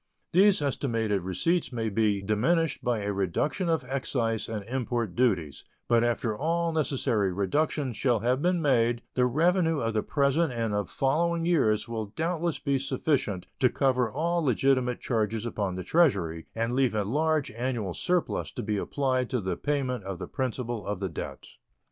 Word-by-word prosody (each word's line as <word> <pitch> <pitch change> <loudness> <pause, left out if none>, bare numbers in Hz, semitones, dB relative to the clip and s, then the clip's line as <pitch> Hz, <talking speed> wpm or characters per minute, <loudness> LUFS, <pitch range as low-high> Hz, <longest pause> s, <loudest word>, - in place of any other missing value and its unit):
These 190 -2 +5
estimated 115 -7 0
receipts 135 - 0
may 115 -2 -2
be 105 -1 +1
diminished 140 - +1
by 120 -3 0
a 100 0 -1
reduction 100 - -1
of 160 -5 0
excise 125 -4 -1
and 105 -3 -4
import 120 -5 -2
duties, 90 - 0 0.2
but 120 -1 +4
after 115 -2 0
all 165 +5 0
necessary 130 -10 +1
reductions 130 - -1
shall 120 -5 +1
have 125 +4 +1
been 175 0 +1
made 120 -4 +2
the 125 -1 +3
revenue 165 +3 +2
of 115 -3 -1
the 110 - +1
present 140 +3 +1
and 115 -3 -1
of 105 -3 -1
following 165 +5 +1
years 115 -11 +2
will 110 -2 -3
doubtless 165 - -2
be 140 -2 0
sufficient 130 - -1
to 130 - +4
cover 130 -3 +1
all 170 +6 0
legitimate 130 -1 +2
charges 110 -1 -1
upon 100 -5 -2
the 95 - -4
Treasury 95 - +2
and 115 +1 -1
leave 130 -3 +2
a 105 - +1
large 150 +6 0
annual 115 -5 -2
surplus 180 - -1
to 125 - -6
be 105 -2 -1
applied 130 +2 0
to 125 - 0
the 95 -3 -2
payment 130 -4 -1
of 95 -1 -5
the - - -5
principal 125 -4 -3
of 100 -2 -3
the 95 -1 -2
debt. 80 - -7
125 Hz, 170 wpm, -28 LUFS, 110-145 Hz, 0.2 s, These